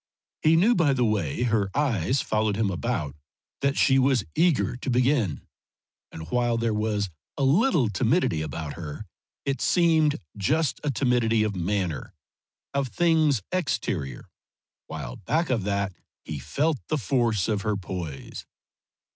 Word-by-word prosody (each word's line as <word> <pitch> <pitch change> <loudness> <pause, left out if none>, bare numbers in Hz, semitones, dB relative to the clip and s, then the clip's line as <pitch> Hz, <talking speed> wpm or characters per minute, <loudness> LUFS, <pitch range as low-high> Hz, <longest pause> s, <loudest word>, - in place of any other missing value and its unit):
He 155 +1 +5
knew 200 +9 +5
by 160 -10 +3
the 125 -2 +2
way 105 - 0
her 110 -5 +1
eyes 130 - +1
followed 110 -1 0
him 105 -2 0
about 90 - -2 0.4
that 140 0 0
she 135 -1 +4
was 130 -4 +3
eager 165 -7 +2
to 130 - -5
begin, 125 - +1 0.7
and 80 0 -8
while 120 -1 +1
there 115 -1 0
was 105 -2 -1 0.3
a 140 - 0
little 160 - +3
timidity 110 - +1
about 80 0 -5
her 75 -4 -7 0.4
it 135 -1 -1
seemed 160 -4 +3 0.2
just 145 +8 0
a 150 - 0
timidity 120 -4 +2
of 105 -2 -1
manner, 90 -5 -2 0.6
of 140 -1 0
things 155 - +2
exterior, 90 - -2 0.6
while 70 -6 -6
back 160 - -1
of 110 -6 0
that 100 -1 -1 0.3
he 75 -3 -5
felt 140 - 0
the 155 - 0
force 115 -4 +1
of 105 -3 0
her 105 0 -1
poise. 85 -6 -6
115 Hz, 145 wpm, -26 LUFS, 95-140 Hz, 0.7 s, He